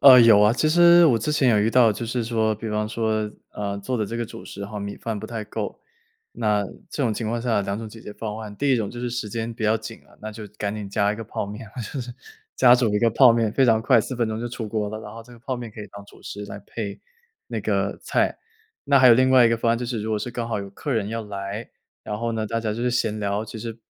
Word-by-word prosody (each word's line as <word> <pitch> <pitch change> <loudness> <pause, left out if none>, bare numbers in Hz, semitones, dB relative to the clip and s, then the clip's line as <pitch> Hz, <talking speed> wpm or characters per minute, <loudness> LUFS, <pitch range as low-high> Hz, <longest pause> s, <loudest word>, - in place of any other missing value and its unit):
呃， 130 -3 +10
有 110 -3 +7
啊。 105 +2 +5
其 125 +6 +1
实 175 +1 +7
我 120 -6 +4
之 150 +8 -1
前 135 -4 +3
有 110 - +4
遇 110 +2 +2
到 115 -3 +5
就 115 - -5
是 115 0 -2
说 110 -2 +1
比 110 +1 -6
方 105 0 -1
说， 110 -1 -1 0.2
呃， 100 -1 -3
做 125 +5 -3
的 110 - 0
这 115 - -5
个 120 - -1
主 - - -10
食 100 0 -7
哈， 105 +1 -6
米 100 0 -5
饭 110 -2 -4
不 110 - -7
太 115 -2 -5
够， - - -5 0.5
那 105 -3 +1 0.3
这 145 - -2
种 115 -4 +1
情 110 0 -3
况 120 +1 -1
下 115 -4 +1
2 100 +2 -3
种 115 -1 -6
解 110 +1 -12
决 105 - -9
方 110 0 -5
案。 105 -2 -8
第 140 -1 +2
一 125 - +4
种 105 -3 -2
就 120 - -9
是 125 - -2
时 120 -3 -3
间 115 +1 -3
比 110 - -8
较 110 +1 +3
紧 110 +1 -8
啊， - - -22
那 110 0 -6
就 105 -1 -8
赶 100 0 -2
紧 105 -2 -6
加 105 0 +1
一 - - -6
个 115 - -5
泡 100 - -4
面， 105 +2 -8
我 - - -3
就 125 +4 -5
是 120 0 -6 0.4
加 125 -1 +7
煮 120 -4 +2
一 - - +3
个 115 - +4
泡 120 +1 +7
面， 115 -2 +1
非 135 - +3
常 115 -3 +4
快， 120 0 +4
4 130 +4 -5
分 120 -2 0
钟 110 0 -3
就 120 - -3
出 115 -2 -5
锅 105 -1 -1
了， 110 +1 -6
然 105 - -9
后 115 0 -9
这 120 +1 -16
个 120 - -14
泡 130 +2 -4
面 120 -2 -7
可 105 - -10
以 105 - -7
当 100 0 -10
主 - - -18
食 105 0 -7
来 100 - -7
配 100 -3 -5 0.5
那 - - -4
个 - - -1
菜。 - - 0 0.5
那 140 -1 +5
还 130 - +7
有 120 - +9
另 130 +2 +4
外 130 -2 +7
一 - - +4
个 115 - +2
方 115 0 +1
案， 115 - 0
就 125 - -4
是 120 -3 -3
如 110 - -3
果 110 - +1
是 115 +4 -4
刚 120 -1 -3
好 110 - -1
有 100 0 -6
客 140 +8 -4
人 110 -4 0
要 115 +1 -3
来， 100 +2 -6 0.3
然 105 - -4
后 115 0 -2
呢 110 -1 -2
大 115 +2 -1
家 110 -2 -2
就 115 +2 -4
是 125 - +1
闲 110 -3 0
聊， 100 +1 -1
其 110 - -9
实 115 +1 -6
110 Hz, 320 characters per minute, -24 LUFS, 105-120 Hz, 0.5 s, 呃